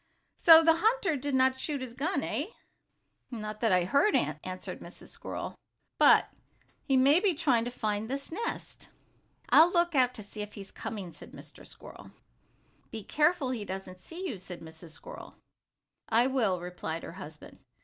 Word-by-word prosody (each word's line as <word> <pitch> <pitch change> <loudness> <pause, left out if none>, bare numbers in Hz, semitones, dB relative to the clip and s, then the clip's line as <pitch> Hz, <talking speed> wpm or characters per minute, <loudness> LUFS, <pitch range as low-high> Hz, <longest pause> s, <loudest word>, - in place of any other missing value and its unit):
"So 325 -1 +9
the 325 0 +5
hunter 420 -3 +2
did 285 0 -2
not 260 0 +3
shoot 290 0 -2
his 255 -2 -7
gun, 315 +10 -1
eh?" - - -2 0.8
"Not 215 -3 -6
that 225 -3 +2
I 180 -1 +4
heard," 280 - +3
answered 155 +6 -3
Mrs. - - -11
Squirrel. - - -6 0.5
"But - - +6 0.6
he 270 -2 +2
may 280 +5 +6
be 385 -3 +1
trying 245 -6 +2
to - - -2
find 215 -2 -3
this 275 +3 -5
nest." 455 +8 -5 0.6
"I'll 330 +3 +7
look 345 -1 +2
out 250 -3 +3
and 210 -2 -9
see 210 - -7
if 210 0 -7
he 200 - -7
is 195 - -12
coming," 195 -6 -6
said - - -13
Mr. - - -12
Squirrel. - - -13 0.8
"Be 220 -2 -7
careful 300 - +1
he 235 -5 -3
doesn't 190 -2 -7
see 355 - -7
you," 225 - -5
said 180 -1 -9
Mrs. 160 +1 -11
Squirrel. - - -11 0.7
"I 230 +2 +4
will," 230 -9 +1
replied 175 -2 -6
her - - -7
husband. 155 -3 -11
250 Hz, 170 wpm, -29 LUFS, 195-305 Hz, 0.8 s, So